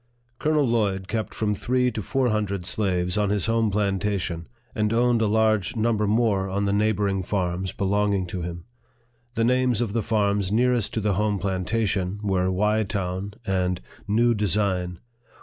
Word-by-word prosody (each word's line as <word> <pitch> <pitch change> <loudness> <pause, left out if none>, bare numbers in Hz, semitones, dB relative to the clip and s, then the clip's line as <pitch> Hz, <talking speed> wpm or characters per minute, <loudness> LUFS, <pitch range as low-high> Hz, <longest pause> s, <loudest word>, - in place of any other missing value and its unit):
Colonel 150 -2 +2
Lloyd 100 -5 0
kept 110 0 -2
from 105 -1 -1
three 125 +4 +1
to 110 - -4
four 130 +5 0
hundred 100 -4 -1
slaves 90 -1 0
on 105 -1 +1
his 105 0 +1
home 115 -1 +2
plantation, 100 -4 -1 0.3
and 105 -1 0
owned 120 0 +3
a 110 - +3
large 110 -1 +2
number 110 -2 +1
more 105 -3 +1
on 100 +2 -1
the 100 - +1
neighboring 100 -2 +1
farms 90 -1 -2
belonging 100 0 0
to 90 0 -5
him. 85 0 -6 0.7
The 115 - +1
names 125 -1 +2
of 115 -4 -1
the 115 - +1
farms 100 -3 0
nearest 120 -1 +1
to 110 - 0
the 105 -1 +1
home 105 +2 0
plantation 95 0 -1
were 95 -2 +1
Wye 105 +4 +2
Town 95 0 -3
and 90 -2 0 0.3
New 115 +3 +3
Design. 95 -4 0
105 Hz, 165 wpm, -24 LUFS, 95-110 Hz, 0.7 s, owned